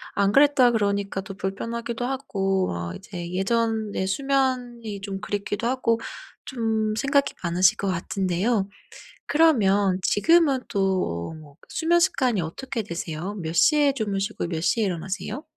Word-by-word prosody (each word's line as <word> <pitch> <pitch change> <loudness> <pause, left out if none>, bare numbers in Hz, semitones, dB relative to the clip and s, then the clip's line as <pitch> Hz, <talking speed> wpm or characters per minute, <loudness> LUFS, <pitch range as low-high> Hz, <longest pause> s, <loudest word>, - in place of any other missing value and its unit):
안 200 0 +2
그랬다 275 -2 +5
그러니까 200 -3 0
또 195 +1 -8
불편하기도 230 +5 -4
하고 195 -8 -1
어 85 0 -4
이제 175 - -7
예전의 215 0 0
수면이 245 -3 -1
좀 195 -1 -5
그립기도 205 +2 -3
하고 235 -3 +1 0.5
좀 220 -3 -1
생각이 280 +4 +1
많으실 175 +1 +3
것 200 - -2
같은데요. 190 +3 0 0.6
그러면 205 - +3
지금은 305 +3 +4
또 190 - 0
어 - - -8
뭐 150 -3 -13
수면 340 +1 +2
습관이 250 - +2
어떻게 225 +9 -4
되세요? 170 +1 -5
몇 165 -4 -4
시에 290 - +4
주무시고 205 -5 -2
몇 165 -2 -3
시에 225 +5 +2
일어나세요? 190 - -4
205 Hz, 305 characters per minute, -24 LUFS, 190-245 Hz, 0.6 s, 그랬다